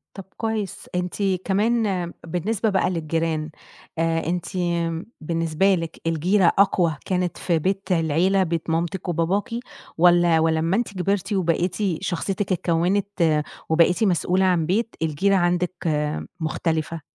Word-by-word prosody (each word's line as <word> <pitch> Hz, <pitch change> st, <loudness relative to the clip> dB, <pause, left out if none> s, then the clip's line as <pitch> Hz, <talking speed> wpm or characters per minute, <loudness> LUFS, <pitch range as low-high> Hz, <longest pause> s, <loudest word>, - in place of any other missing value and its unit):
طَب 195 Hz, -, -7 dB
كويس 215 Hz, -4 st, -3 dB
أنتِ 180 Hz, 0 st, -2 dB, 0.3 s
كمان 200 Hz, -3 st, +1 dB
بالنسبة 195 Hz, +6 st, -1 dB
بقى 190 Hz, -2 st, +1 dB
للجيران، 160 Hz, -2 st, -1 dB, 0.5 s
آآ 165 Hz, 0 st, 0 dB
أنتِ 175 Hz, 0 st, -1 dB, 0.8 s
بالنسبة 165 Hz, +4 st, +1 dB
لك 165 Hz, -2 st, -6 dB
الجيرة 175 Hz, +5 st, +2 dB
أقوى 180 Hz, -5 st, +3 dB
كانت 180 Hz, -2 st, -1 dB
في 170 Hz, -3 st, 0 dB
بيت 190 Hz, +3 st, -2 dB
العيلة 175 Hz, +3 st, +2 dB
بيت 170 Hz, -2 st, -3 dB
مامتِك 170 Hz, +3 st, -1 dB
وباباكِ 175 Hz, +8 st, 0 dB, 0.5 s
واّلا 175 Hz, -1 st, +5 dB
ولما 160 Hz, +2 st, +1 dB
أنتِ 230 Hz, -2 st, -1 dB
كبرتِ 195 Hz, +2 st, -1 dB
وبقيتِ 180 Hz, -1 st, 0 dB, 0.3 s
شخصيتك 190 Hz, +2 st, -2 dB
اتكونت 175 Hz, -2 st, +1 dB, 0.3 s
وبقيتِ 170 Hz, +6 st, +3 dB
مسئولة 185 Hz, -1 st, +2 dB
عن 175 Hz, -3 st, +2 dB
بيت 220 Hz, +7 st, -1 dB
الجيرة 160 Hz, +6 st, +2 dB
عندِك 180 Hz, 0 st, +1 dB, 0.7 s
مختلفة؟ 160 Hz, 0 st, -2 dB
175 Hz, 120 wpm, -23 LUFS, 165-195 Hz, 0.8 s, واّلا